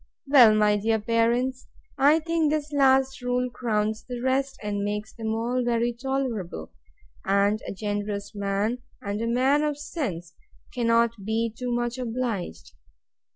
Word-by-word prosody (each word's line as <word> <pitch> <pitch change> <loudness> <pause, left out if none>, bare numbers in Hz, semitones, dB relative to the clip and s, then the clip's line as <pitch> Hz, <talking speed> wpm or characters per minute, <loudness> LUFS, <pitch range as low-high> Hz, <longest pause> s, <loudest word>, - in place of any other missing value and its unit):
Well, 255 -6 +7
my 210 -1 +3
dear 220 +2 +1
parents, 235 +4 0 0.3
I 295 +4 +4
think 330 -1 +1
this 300 -1 -2
last 265 -1 +3
rule 250 0 -1
crowns 220 -2 -1
the 245 -1 -6
rest, 265 +2 0
and 205 -1 -2
makes 210 +1 -3
them 220 -1 -3
all 245 +3 -1
very 240 0 +1
tolerable; 235 - -3 0.5
and 200 +2 +2
a - - -3
generous 205 0 -4
man, 200 +4 -1 0.2
and 200 +1 -4
a 230 - -1
man 260 +5 +3
of 300 -1 -1
sense, 190 - -5 0.4
cannot 230 -3 +1
be 220 +2 -1
too 250 +1 -4
much 240 +1 -1
obliged. 225 - -4
235 Hz, 145 wpm, -26 LUFS, 210-260 Hz, 0.5 s, Well